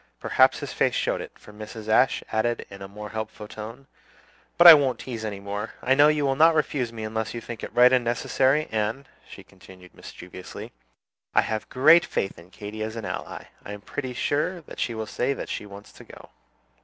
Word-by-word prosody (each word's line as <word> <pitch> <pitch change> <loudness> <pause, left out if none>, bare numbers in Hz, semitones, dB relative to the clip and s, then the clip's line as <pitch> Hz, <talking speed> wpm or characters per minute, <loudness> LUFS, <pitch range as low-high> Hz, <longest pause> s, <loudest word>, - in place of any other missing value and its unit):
Perhaps - - +3
his - - -6
face - - +1
showed - - -1
it, - - -10
for 105 - -16
Mrs. 110 +1 -9
Ashe 125 +4 +3
added 115 +2 -1
in 100 0 -11
a 95 - -7
more 105 +2 -9
hopeful 110 -1 -6
tone, 115 +6 -9 0.7
"But 175 - +5
I 170 - +14
won't 135 -5 +2
tease 115 -3 -7
any 105 -2 -4
more. 100 +2 -6
I 130 - +3
know 145 +2 +6
you 150 -1 +1
will 135 -1 +1
not 160 +3 +5
refuse 135 -6 -1
me 115 -1 -7
unless 110 +1 -4
you - - -3
think 115 0 -9
it - - -6
right 125 +1 +5
and 125 -1 +3
necessary; 130 +5 +1
and," 110 +5 -2 0.2
she - - -11
continued 90 -1 -17
mischievously, 90 +1 -10 0.6
"I - - +6
have 110 -1 -4
great 155 +6 +6
faith 95 - -3
in 85 +2 -16
Katy 105 +3 -8
as 110 +1 -4
an 115 -2 -6
ally. - - -6 0.2
I 105 - -7
am 105 - -9
pretty 130 +3 -6
sure 170 +8 -1
that - - -12
she 120 - -2
will 110 0 -4
say 125 +5 -1
that - - -7
she 105 - -5
wants 100 +1 -12
to - - -15
go." - - -15
115 Hz, 215 wpm, -25 LUFS, 105-135 Hz, 0.7 s, I